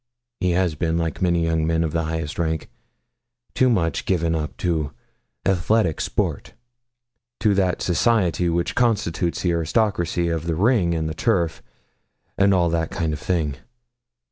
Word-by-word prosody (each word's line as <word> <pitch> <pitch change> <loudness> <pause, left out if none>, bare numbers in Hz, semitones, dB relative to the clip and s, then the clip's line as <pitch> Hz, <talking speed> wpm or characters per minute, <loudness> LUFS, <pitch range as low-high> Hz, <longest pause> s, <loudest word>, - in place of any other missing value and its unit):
He 90 -1 +1
has 90 -2 +1
been, 80 +1 -1
like 85 +1 -2
many 85 -2 +2
young 80 -1 +1
men 80 0 +1
of 80 - -1
the 80 0 -1
highest 80 -1 -4
rank, 80 -2 -2 0.8
too 130 - +3
much 85 - 0
given 85 -3 +1
up 75 -2 -3
to 80 -5 -1 0.5
athletic 95 -1 +2
sports - - -2 0.9
to 105 -2 +3
that 95 -2 +1
society 90 -1 +2
which 85 +1 0
constitutes 95 -8 0
the 90 - +2
aristocracy 85 0 0
of 80 0 -2
the 80 - 0
ring 95 -3 +2
and 80 -1 -1
the 80 - -3
turf, 85 -3 0 0.7
and 100 0 +4
all 90 -3 +3
that 80 -1 -1
kind 85 -6 -2
of 75 - -4
thing. 80 -4 -1
85 Hz, 155 wpm, -22 LUFS, 80-95 Hz, 0.9 s, and